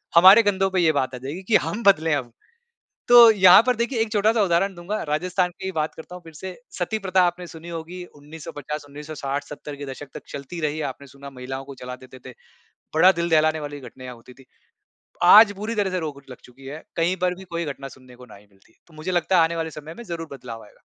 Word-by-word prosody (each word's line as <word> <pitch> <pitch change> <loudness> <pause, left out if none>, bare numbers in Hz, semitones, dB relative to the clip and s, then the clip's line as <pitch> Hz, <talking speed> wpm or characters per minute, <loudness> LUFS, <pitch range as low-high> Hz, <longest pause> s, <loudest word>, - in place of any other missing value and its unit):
हमारे 190 +6 +9
कंधों 195 -2 +1
पे 185 - 0
ये 165 -2 +4
बात 130 -2 -1
आ - - -6
जाएगी 145 +9 -7
कि 210 +3 +1
हम 230 +3 -4
बदलें 165 -6 +4
अब 125 -4 -5 0.8
तो 240 -1 +9
यहाँ 190 -1 +7
पर 250 -1 +2
देखिए 235 +1 -1
एक 225 -1 0
छोटा-सा 215 +1 +2
उदाहरण 190 +2 +1
दूँगा। 180 +5 -4
राजस्थान 180 +4 0
की - - -7
ही 190 - -3
बात 155 -2 -2
करता 160 +2 -11
हूँ 180 - -10
फिर 165 - -12
से, 185 +4 -8 0.2
सती-प्रथा 190 0 0
आपने 175 +1 -4
सुनी 165 0 -11
होगी 170 +2 -7
1950 150 0 -8
1960-70 145 0 -6
के 145 - -8
दशक 135 +1 -8
तक - - -8
चलती 140 +5 -7
रही, 155 0 -2
आपने 140 0 -6
सुना 140 +1 -12
महिलाओं 130 +1 -7
को 140 0 -10
जला 125 0 -6
देते 130 0 -14
थे। 125 - -15 0.6
बड़ा 180 +4 +6
दिल 170 0 -3
दहलाने 155 0 +3
वाली 145 -1 -7
घटनाएँ 130 0 -10
होती 120 +1 -15
थी। 135 - -19 0.8
आज 205 +3 +8
पूरी 215 +3 -4
तरह 205 -3 0
से 185 - -1
रोक 150 -4 -6
लग 125 - -10
चुकी 130 +2 -17
है, 145 +4 -8
कहीं 170 +2 +1
पर 180 0 +1
भी 190 - -12
कोई 170 -2 -4
घटना 135 -2 -6
सुनने 130 -1 -16
को 125 0 -14
नहीं 105 -3 -16
मिलती, 95 +3 -28
तो 165 - -22
मुझे 155 +4 -5
लगता 180 +1 +1
है 165 - +6
आने 165 +1 -1
वाले 165 -1 -3
समय 155 +2 -10
में 235 - -8
ज़रूर 170 -5 -6
बदलाव 120 -4 -9
आएगा। 105 - -21
160 Hz, 230 wpm, -23 LUFS, 140-185 Hz, 0.8 s, हमारे